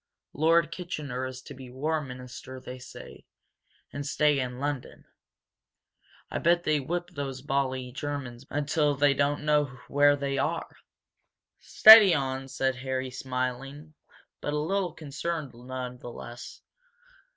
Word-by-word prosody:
Lord 165 +2 +3
Kitchener 145 -7 -4
is 130 0 -9
to - - -10
be 130 -1 -11
War 155 +5 -1
Minister, 125 -1 -9
they 125 0 -9
say, 125 - -12 0.7
and 145 - -4
stay 150 0 +2
in 125 -1 -3
London. 140 -1 -4 1.3
I - - -2
bet 175 +1 +3
they 155 -2 +2
whip 175 +6 -3
those 135 -4 -5
bally 130 -2 -1
Germans 130 -3 -5
until 145 0 +1
they 140 0 +4
don't 145 +1 0
know 150 -1 +3 0.2
where 145 0 +4
they 140 -1 -2
are 165 +4 -2 0.5
" - - -58 0.2
"Steady 215 -5 +11
on!" 135 -1 -2
said 130 -1 -1
Harry, 130 0 -3
smiling, 130 +4 -4 0.5
but 145 - -3
a - - 0
little 180 +3 -1
concerned, 150 0 -4
none 125 +1 -7
the 120 - -8
less. 120 +1 -10
140 Hz, 140 wpm, -28 LUFS, 130-150 Hz, 1.3 s, Steady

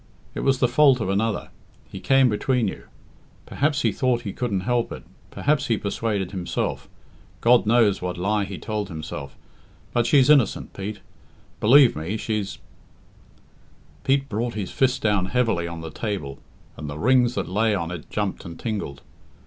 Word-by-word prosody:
It - - -5
was 135 -1 +2
the 125 - +3
fault 135 +1 +5
of 110 - -2
another. 105 +2 -1 0.4
He - - -7
came 135 -1 +4
between 120 +1 +1
you. - - -6 0.6
Perhaps 150 +1 0
he - - +3
thought 125 -2 0
he 105 -5 -5
couldn't 105 -7 -2
help 120 +3 0
it - - -7 0.3
perhaps 145 -1 0
he 115 - +1
persuaded 100 -2 -2
himself 90 -3 -3 0.5
God 120 -2 +4
knows 110 -4 +3
what 90 -1 -3
lie 100 +3 0
he 95 -1 -7
told 105 +5 -3
himself 80 -4 -7 0.6
but 120 -1 +2
she's 140 -3 +5
innocent, 145 -7 +3
Pete; 100 +1 -6 0.6
believe 130 +3 +6
me, 80 +8 -3
she's 105 -2 -3 0.7
" - - -30
Pete 135 0 +2
brought 115 +2 -2
his 100 -4 -4
fist 130 -1 +1
down 105 -4 +2
heavily 110 -5 0
on 85 -1 -6
the 80 -1 -7
table, 75 -10 -4 0.4
and 75 -1 -6
the 75 - -6
rings 125 +4 +3
that - - -2
lay 105 +3 +1
on 85 -3 -3
it 85 -3 -8
jumped 105 -2 -3
and 85 -1 -9
tingled. 100 -11 -4
110 Hz, 170 wpm, -24 LUFS, 95-125 Hz, 0.7 s, believe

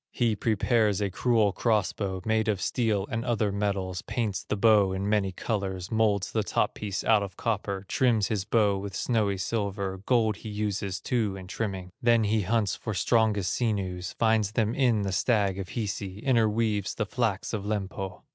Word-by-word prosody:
He 115 -3 +1
prepares 110 -1 +1
a 100 -2 -1
cruel 110 0 +2
cross 110 -1 +1
bow, 95 -3 -4
Made 110 0 +1
of 105 -4 +1
steel 105 -2 0
and 115 +1 -1
other 110 -4 0
metals, 100 -3 -2
Paints 110 -4 -2
the 105 - -3
bow 105 -3 +4
in 95 +1 -2
many 105 -2 +1
colors, 95 -2 -3
Molds 110 -3 +1
the 110 - +1
top 100 - 0
piece 105 -2 -4
out 110 -2 +4
of 95 -2 -6
copper, 100 -4 -2
Trims 115 -4 +2
his 105 -4 -1
bow 100 -2 +2
with 100 -1 -6
snowy 105 -3 0
silver, 100 -1 -2
Gold 110 -5 +2
he 110 - -8
uses 105 -2 -2
too 110 -6 -1
in 95 -1 -8
trimming. 95 -2 -4
Then 115 -1 +4
he 105 +1 +1
hunts 105 0 +1
for 110 - -5
strongest 105 0 +2
sinews, 95 -6 -2
Finds 110 -3 +1
them 110 -1 +1
in 120 -6 +2
the 100 - -2
stag 100 0 +1
of 95 - -5
Hisi, 100 -4 -4
Interweaves 110 -5 +1
the 105 - -1
flax 110 -2 -1
of 105 -3 -2
Lempo. 95 -3 -4
105 Hz, 180 wpm, -27 LUFS, 95-110 Hz, -, bow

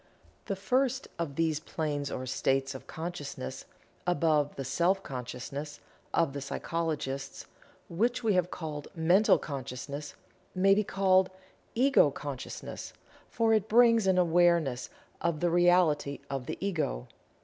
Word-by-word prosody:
The 195 - -2
first 255 +7 0
of 155 -5 -3
these 160 -2 +1
planes 150 -3 -3
or 130 - -4
states 135 +1 0
of 130 - -10
Consciousness, 160 - -6 0.4
above 155 -4 +2
the 135 - -5
"Self 175 +9 +1
Consciousness" 135 +3 -6 0.3
of 165 -5 +1
the 140 - -4
psychologists 145 -2 -3 0.4
(which 235 +9 0
we 220 -2 +3
have 180 -1 +2
called 150 -4 -6
"Mental 175 +6 +5
Consciousness") 140 +1 -6 0.4
may 195 +2 +5
be 210 +2 +2
called 190 -1 +3 0.5
"Ego 265 - +5
consciousness," 140 -2 -7 0.4
for 225 -1 +2
it 215 -1 +1
brings 230 -2 +5
an 190 -1 +4
"awareness" 170 -6 +3 0.3
of 170 -2 0
the 175 +1 +1
Reality 175 -5 +3
of 135 -2 -3
the - - -4
Ego. 160 - -2
165 Hz, 130 wpm, -30 LUFS, 140-190 Hz, 0.5 s, Mental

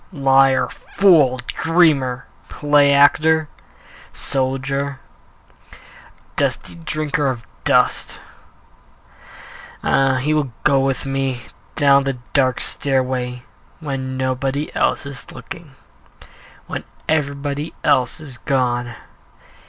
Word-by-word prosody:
Liar, 135 -3 +3
fool, 160 -10 +3
dreamer, 155 -7 +2 0.2
play 145 -1 +3
actor, 155 +3 +4 0.7
Soldier, 135 +1 -2 1.4
dusty 90 - -1
drinker 145 - -2
of 120 -4 -3 0.2
dust - - +2 1.7
Ah! 135 -1 +2
he 140 +4 0
will 150 -4 0
go 140 -2 +4
with 135 0 -1
me 135 -2 -2 0.3
Down 140 -2 +4
the 135 -2 -2 0.2
dark 130 -3 +2
stairway 130 -2 -1 0.4
When 135 -4 -4
nobody 135 +3 -2
else - - +1
is 140 -1 -8
looking, 160 -6 -10 0.9
When - - -5 0.2
everybody 145 0 -2
else 125 0 +2
is 135 -6 -10
gone. 120 -3 -1
135 Hz, 90 wpm, -20 LUFS, 130-145 Hz, 1.7 s, actor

